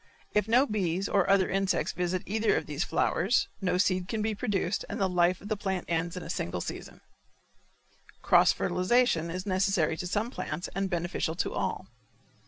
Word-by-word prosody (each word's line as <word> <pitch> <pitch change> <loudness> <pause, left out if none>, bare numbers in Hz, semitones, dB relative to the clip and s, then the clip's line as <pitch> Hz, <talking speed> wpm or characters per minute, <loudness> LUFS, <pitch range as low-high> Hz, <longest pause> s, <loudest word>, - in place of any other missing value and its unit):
If 210 -1 +2
no 245 +5 +5
bees 195 - -1
or 195 -1 +2
other 195 -1 +4
insects 195 0 0
visit 180 +1 -1
either 220 +2 +1
of - - -1
these - - -2
flowers - - +1
no 180 -2 +1
seed 185 -1 +1
can 220 0 -2
be 220 0 0
produced 200 -3 -1
and - - -4
the 195 - +2
life 180 0 +2
of 205 - -9
the 215 - 0
plant 190 -2 -3
ends 170 +1 -1
in 180 - -5
a - - -8
single 85 - -3
season. - - -7 1.2
Cross - - +5
fertilization 185 -4 +1
is 185 +3 -4
necessary 185 -4 +1
to 180 - -4
some 210 +6 -1
plants 175 - -4
and 195 0 -1
beneficial 175 -2 -2
to - - -2
all. - - -2
185 Hz, 185 wpm, -29 LUFS, 175-205 Hz, 1.2 s, no